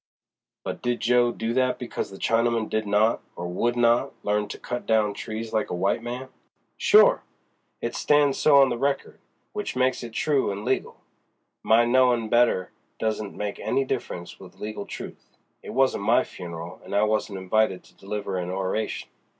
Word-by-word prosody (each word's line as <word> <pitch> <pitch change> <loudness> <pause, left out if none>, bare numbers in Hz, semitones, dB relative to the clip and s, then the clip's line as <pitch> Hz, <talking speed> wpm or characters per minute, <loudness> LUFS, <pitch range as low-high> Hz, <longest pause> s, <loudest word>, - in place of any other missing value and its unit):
"But - - -5
did 120 -1 -1
Jo. 120 0 +3
do 115 0 -3
that 130 0 +1
because 125 - -4
the 95 - -10
Chinaman 115 0 +1
did 110 -1 -1
not, 105 +3 +2
or 90 - -5
would 120 +7 0
not, 120 +3 +3
learn 105 0 0
to - - -7
cut 120 0 -5
down 110 -2 +2
trees 110 +2 -6
like 110 - 0
a - - -2
white 95 +5 0
man?" 125 +2 -6 0.5
"Sure!—it 480 +4 +2
stan's 145 -2 +3
so 145 -2 +6
on 135 -1 +6
the 120 -1 -3
record, 140 +1 -1 0.3
which - - -4
makes 130 0 +1
it 120 -2 -8
true 140 -4 +1
an' 100 +2 -6
legal. - - -2 0.6
My 115 +2 +4
knowin' 120 -2 +3
better 120 -6 +3 0.3
doesn't 110 -2 -2
make 105 -1 -4
any 135 - 0
difference 105 -9 -5
with - - -13
legal 105 -1 -6
truth; - - -10 0.2
it - - -10
wasn't 130 -5 +1
my 115 +4 +4
funeral 85 0 -8
and - - -5
I 100 - +4
wasn't 105 -2 0
invited 95 0 +1
to - - -21
deliver 100 -1 -4
an 90 0 -4
oration. 95 +3 -2
110 Hz, 175 wpm, -25 LUFS, 100-125 Hz, 0.6 s, so